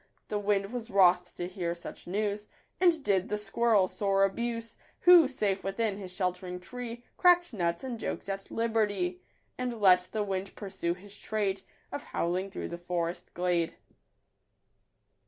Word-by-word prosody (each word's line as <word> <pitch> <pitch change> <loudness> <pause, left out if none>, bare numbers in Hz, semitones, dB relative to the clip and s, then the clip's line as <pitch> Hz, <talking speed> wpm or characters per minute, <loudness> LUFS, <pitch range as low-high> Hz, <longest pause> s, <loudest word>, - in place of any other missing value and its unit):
The 210 - 0
wind 200 +1 0
was 240 -2 -4
wroth 180 -3 +4
to 175 - -3
hear 175 -2 -3
such 170 - -9
news, 205 +2 -1 0.3
And 340 -5 +4
did 195 -5 +2
the 210 - 0
squirrel 210 -1 +2
sore 195 0 +1
abuse; 230 +3 -1 0.3
Who, 350 -4 +8
safe 205 -7 -1
within 195 +1 -1
his 190 -3 -7
shelt'ring 180 -1 -2
tree, 240 +4 -7
Crack'd 350 -4 +5
nuts 170 -2 -1
and 245 -3 -4
jokes - - -4
at 195 0 -4
liberty; 205 -6 0 0.4
And 245 -2 -2
let 185 -2 +6
the 215 -1 0
wind 195 -1 -3
pursue 190 -4 -3
his 200 +2 -12
trade 200 -3 -1 0.3
Of 285 - -4
howling 185 -1 -2
through 195 - -5
the 170 - -6
forest 175 -1 -3
glade. 175 -2 0
195 Hz, 155 wpm, -30 LUFS, 180-225 Hz, 0.4 s, Who